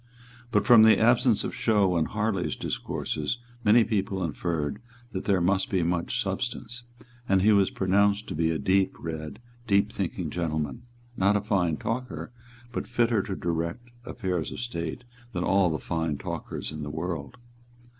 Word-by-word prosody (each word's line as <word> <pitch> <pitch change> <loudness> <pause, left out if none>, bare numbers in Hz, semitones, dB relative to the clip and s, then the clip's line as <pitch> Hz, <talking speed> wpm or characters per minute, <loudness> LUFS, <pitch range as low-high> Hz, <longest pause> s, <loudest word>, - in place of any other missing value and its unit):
But 105 -3 +2
from 120 -2 +8
the 110 0 +7
absence 120 -1 +4
of - - -3
show 100 -5 +2
in 80 -2 +2
Harley's 105 -2 -1
discourses 75 +10 -3 0.3
many 115 +2 +6
people 95 -3 -1
inferred 85 +3 -2 0.3
that 95 - -4
there 100 -3 +3
must 95 +7 +1
be 95 -6 +1
much 85 +8 -1
substance; 120 +3 -3 0.5
and 95 -1 +4
he 110 - +6
was 100 -2 +4
pronounced 100 +2 +2
to - - -3
be 80 +1 +1
a 80 - 0
deep 95 +3 +2
read, 80 -3 -6 0.3
deep 100 0 +3
thinking 90 -5 -3
gentleman, 80 - -3 0.3
not 100 +1 +3
a - - -1
fine 90 -6 +1
talker, 125 +1 -4 0.4
but - - -4
fitter 120 -3 +2
to 95 - -4
direct 85 +8 -3
affairs 90 -10 -3
of - - -6
state 100 -2 -4 0.3
than 90 - -1
all 95 -1 +3
the 80 - -1
fine 80 -3 -2
talkers - - -5
in 75 0 -6
the 75 - -4
world. 80 -2 -4
95 Hz, 165 wpm, -27 LUFS, 85-110 Hz, 0.5 s, from